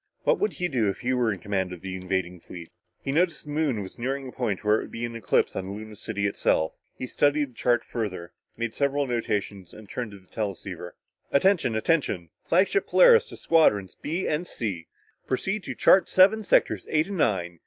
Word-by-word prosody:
What -, -, +2 dB
would 420 Hz, -, 0 dB
he 180 Hz, -, -2 dB
do 120 Hz, -, +1 dB
if 95 Hz, -, -5 dB
he 130 Hz, +1 st, 0 dB
were 120 Hz, -3 st, +2 dB
in 100 Hz, -, -3 dB
command 95 Hz, -1 st, -2 dB
of 90 Hz, -2 st, -8 dB
the 95 Hz, -1 st, -5 dB
invading 90 Hz, -1 st, -3 dB
fleet? 85 Hz, 0 st, -11 dB, 0.3 s
He 135 Hz, -, -2 dB
noticed 170 Hz, +2 st, +1 dB
the 150 Hz, -, -9 dB
Moon 145 Hz, -8 st, 0 dB
was 95 Hz, -, -11 dB
nearing 135 Hz, +2 st, -2 dB
a -, -, -8 dB
point 110 Hz, -7 st, -2 dB
where 105 Hz, +1 st, +3 dB
it -, -, -5 dB
would -, -, -14 dB
be 115 Hz, +1 st, -3 dB
in 115 Hz, 0 st, -6 dB
eclipse 115 Hz, -5 st, +1 dB
on 95 Hz, +1 st, -4 dB
Luna 110 Hz, +1 st, -8 dB
City 100 Hz, -1 st, -3 dB
itself. 80 Hz, -5 st, +1 dB, 0.2 s
He -, -, -4 dB
studied 145 Hz, +1 st, +1 dB
the -, -, -25 dB
chart 120 Hz, +1 st, +1 dB
further, 95 Hz, -7 st, -5 dB, 0.2 s
made 115 Hz, -1 st, -3 dB
several 140 Hz, 0 st, 0 dB
notations 105 Hz, -6 st, -3 dB
and 110 Hz, -1 st, -12 dB
turned 120 Hz, +2 st, -4 dB
to 100 Hz, -, -11 dB
the 95 Hz, -, -24 dB
teleceiver. 95 Hz, -4 st, -5 dB, 0.4 s
"Attention 155 Hz, -, +3 dB
attention 110 Hz, -, 0 dB
flagship 190 Hz, -, +2 dB
Polaris -, -, +6 dB
to -, -, -11 dB
Squadrons 105 Hz, -, +3 dB
B 165 Hz, +5 st, -3 dB
and 160 Hz, +4 st, -1 dB
C 95 Hz, -8 st, -4 dB, 0.4 s
proceed 195 Hz, +10 st, -1 dB
to -, -, -5 dB
chart 190 Hz, -2 st, +5 dB
seven 200 Hz, +4 st, +5 dB
sectors -, -, +2 dB
eight 155 Hz, 0 st, +2 dB
and 195 Hz, -1 st, -5 dB
nine. 85 Hz, -, 0 dB
115 Hz, 205 wpm, -26 LUFS, 95-150 Hz, 0.4 s, Polaris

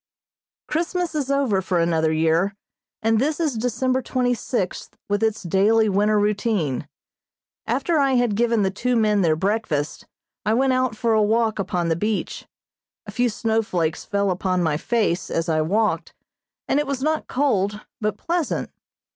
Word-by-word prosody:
Christmas 345 Hz, +2 st, -1 dB
is 290 Hz, -3 st, -2 dB
over 270 Hz, -9 st, +1 dB
for 185 Hz, -1 st, -1 dB
another 165 Hz, -2 st, +2 dB
year, 165 Hz, +5 st, +1 dB, 0.5 s
and 225 Hz, 0 st, +3 dB
this 295 Hz, +3 st, 0 dB
is 315 Hz, -5 st, +1 dB
December 250 Hz, +3 st, 0 dB
twenty 250 Hz, 0 st, 0 dB
sixth 225 Hz, -5 st, -3 dB
with 205 Hz, +1 st, 0 dB
its 220 Hz, -1 st, 0 dB
daily 205 Hz, +5 st, +3 dB
winter 210 Hz, +2 st, +2 dB
routine. 205 Hz, -, 0 dB, 0.8 s
After 335 Hz, -3 st, +1 dB
I 275 Hz, -1 st, +3 dB
had 245 Hz, -3 st, +2 dB
given 230 Hz, 0 st, +2 dB
the 190 Hz, -, +1 dB
two 245 Hz, +5 st, -1 dB
men 210 Hz, -3 st, +3 dB
their 160 Hz, -3 st, +3 dB
breakfast, 185 Hz, -5 st, -2 dB, 0.4 s
I 215 Hz, +3 st, +1 dB
went 265 Hz, +1 st, +2 dB
out 255 Hz, -3 st, 0 dB
for 230 Hz, +1 st, +1 dB
a 215 Hz, -, +4 dB
walk 220 Hz, +1 st, +1 dB
upon 180 Hz, -3 st, -1 dB
the 165 Hz, -, +2 dB
beach. 210 Hz, +5 st, -3 dB, 0.6 s
A 205 Hz, -, -8 dB
few 245 Hz, +3 st, +1 dB
snowflakes 210 Hz, -8 st, -1 dB
fell 200 Hz, -1 st, 0 dB
upon 185 Hz, 0 st, 0 dB
my 160 Hz, -3 st, +1 dB
face 190 Hz, +1 st, 0 dB
as 165 Hz, +1 st, -1 dB
I 160 Hz, -1 st, +1 dB
walked, 175 Hz, -1 st, 0 dB, 0.5 s
and 280 Hz, -, +2 dB
it 295 Hz, -, -1 dB
was 275 Hz, -1 st, -2 dB
not 310 Hz, +1 st, 0 dB
cold 210 Hz, -7 st, 0 dB, 0.2 s
but 215 Hz, -1 st, -1 dB
pleasant. 340 Hz, +3 st, -2 dB
215 Hz, 165 wpm, -23 LUFS, 185-245 Hz, 0.8 s, a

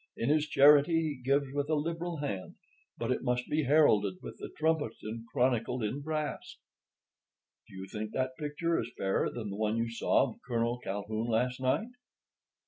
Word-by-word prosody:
In 115 Hz, -, 0 dB
his 155 Hz, 0 st, +3 dB
charity, 150 Hz, +3 st, +5 dB
he 140 Hz, -4 st, -7 dB
gives 140 Hz, +1 st, +1 dB
with 145 Hz, +1 st, -1 dB
a 155 Hz, -, +3 dB
liberal 165 Hz, +3 st, -2 dB
hand; 105 Hz, -, -4 dB, 0.4 s
but 115 Hz, +1 st, -2 dB
it -, -, 0 dB
must 125 Hz, -1 st, -1 dB
be 150 Hz, -1 st, 0 dB
heralded 115 Hz, -9 st, +4 dB
with -, -, -7 dB
the -, -, -6 dB
trumpet 155 Hz, -7 st, +1 dB
and 115 Hz, +2 st, -6 dB
chronicled 125 Hz, -1 st, 0 dB
in 125 Hz, +7 st, -2 dB
brass.' 155 Hz, 0 st, -4 dB, 1.1 s
"Do -, -, -14 dB
you 95 Hz, 0 st, -6 dB
think 105 Hz, +2 st, -5 dB
that 130 Hz, 0 st, -1 dB
picture 155 Hz, +3 st, -1 dB
is 120 Hz, -, -4 dB
fairer 95 Hz, 0 st, +1 dB
than 110 Hz, -4 st, -5 dB
the 100 Hz, -, -5 dB
one 110 Hz, +1 st, 0 dB
you 115 Hz, 0 st, -1 dB
saw 115 Hz, +3 st, +2 dB
of -, -, -15 dB
Colonel 120 Hz, 0 st, -1 dB
Calhoun 110 Hz, +2 st, -3 dB
last 125 Hz, +2 st, 0 dB
night?" 130 Hz, -, +1 dB
130 Hz, 180 wpm, -31 LUFS, 115-150 Hz, 1.1 s, charity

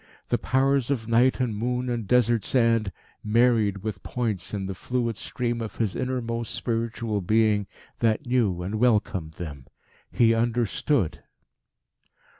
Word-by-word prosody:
The -, -, +1 dB
powers 135 Hz, +1 st, +1 dB
of 120 Hz, -6 st, -1 dB
night 120 Hz, +4 st, +3 dB
and 120 Hz, -4 st, 0 dB
moon 125 Hz, +3 st, -1 dB
and 120 Hz, -4 st, -2 dB
desert 120 Hz, -2 st, +3 dB
sand 115 Hz, -5 st, +2 dB, 0.3 s
married 110 Hz, -3 st, +2 dB
with 105 Hz, -4 st, -4 dB
points 110 Hz, -7 st, -3 dB
in 100 Hz, -2 st, -3 dB
the 95 Hz, -, -3 dB
fluid 115 Hz, +4 st, -2 dB
stream 120 Hz, +3 st, -3 dB
of 110 Hz, -, -5 dB
his 110 Hz, -4 st, -1 dB
inmost 115 Hz, -3 st, -2 dB
spiritual 115 Hz, -2 st, -2 dB
being 105 Hz, +1 st, +2 dB, 0.3 s
that 115 Hz, +4 st, +1 dB
knew 110 Hz, -8 st, +1 dB
and 105 Hz, +4 st, -3 dB
welcomed 105 Hz, -9 st, +1 dB
them. 70 Hz, -6 st, -8 dB, 0.4 s
He 115 Hz, -1 st, +4 dB
understood. 115 Hz, -, 0 dB
115 Hz, 135 wpm, -26 LUFS, 105-120 Hz, 0.4 s, He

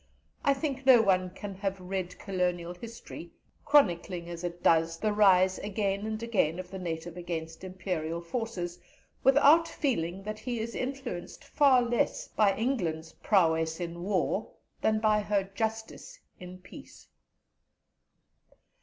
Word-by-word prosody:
I 280 Hz, -1 st, +3 dB
think 275 Hz, -2 st, -3 dB
no 255 Hz, -3 st, +9 dB
one 185 Hz, -2 st, +2 dB
can 200 Hz, +2 st, -8 dB
have 195 Hz, 0 st, -3 dB
read 185 Hz, 0 st, -4 dB
Colonial 180 Hz, -3 st, -2 dB
history, 200 Hz, -3 st, -10 dB, 0.3 s
chronicling 180 Hz, -, +2 dB
as 170 Hz, 0 st, -7 dB
it 175 Hz, 0 st, -5 dB
does, 165 Hz, 0 st, +3 dB
the 215 Hz, +2 st, 0 dB
rise 190 Hz, -3 st, +4 dB
again 200 Hz, 0 st, -2 dB
and 220 Hz, +1 st, -4 dB
again 190 Hz, -8 st, +1 dB
of 185 Hz, 0 st, -7 dB
the 190 Hz, -, -6 dB
native 170 Hz, -1 st, -5 dB
against 165 Hz, -1 st, -5 dB
Imperial 175 Hz, -3 st, -3 dB
forces, 175 Hz, -2 st, -4 dB, 0.4 s
without 285 Hz, +5 st, +6 dB
feeling 195 Hz, -, -2 dB
that 215 Hz, +1 st, -5 dB
he 240 Hz, +1 st, -3 dB
is 230 Hz, +1 st, -4 dB
influenced 255 Hz, -8 st, -5 dB
far 270 Hz, -4 st, +4 dB
less 240 Hz, 0 st, 0 dB
by 205 Hz, -3 st, +2 dB
England's 170 Hz, -10 st, -2 dB
prowess 160 Hz, -4 st, +1 dB
in 170 Hz, -1 st, -5 dB
war 190 Hz, +1 st, -1 dB, 0.3 s
than 215 Hz, 0 st, +2 dB
by 215 Hz, -1 st, +3 dB
her 205 Hz, -1 st, 0 dB
justice 220 Hz, -, -5 dB, 0.2 s
in 180 Hz, 0 st, -9 dB
peace. 270 Hz, +10 st, -14 dB
195 Hz, 135 wpm, -29 LUFS, 175-225 Hz, 0.4 s, no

